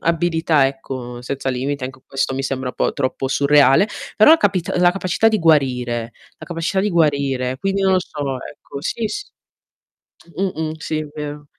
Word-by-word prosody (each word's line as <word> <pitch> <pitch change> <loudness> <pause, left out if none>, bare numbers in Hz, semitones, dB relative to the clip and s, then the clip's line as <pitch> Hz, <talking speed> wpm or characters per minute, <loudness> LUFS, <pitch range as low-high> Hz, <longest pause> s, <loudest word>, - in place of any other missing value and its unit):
abilità, 165 -3 +2
ecco, 130 -3 -6
senza 135 +2 -3
limiti, 130 +2 -2
anch 130 0 -8
questo 135 -1 -1
mi 135 - -2
sembra 130 -2 -3
po' - - 0
troppo 135 0 -2
surreale, 140 +5 +5 0.3
però 220 +8 +8
a - - +7
capit 190 - 0
la 180 0 +5
capacità 185 +3 +1
di 220 -1 +1
guarire, 125 -7 +1 0.3
la - - -10
capacità 175 +3 -1
di 210 - +1
guarire. 140 -6 +1
Quindi, 195 +4 -1
non 190 0 +3
lo 185 - +3
so, 160 - -10 0.2
ecco, 140 -1 -9
sì, 225 +9 -2
s 420 - -5 1.1
Mh-mh. 160 -5 -2
Sì, 155 - -2
è 155 - -5
vero. 150 0 -6
150 Hz, 170 wpm, -20 LUFS, 135-180 Hz, 1.1 s, però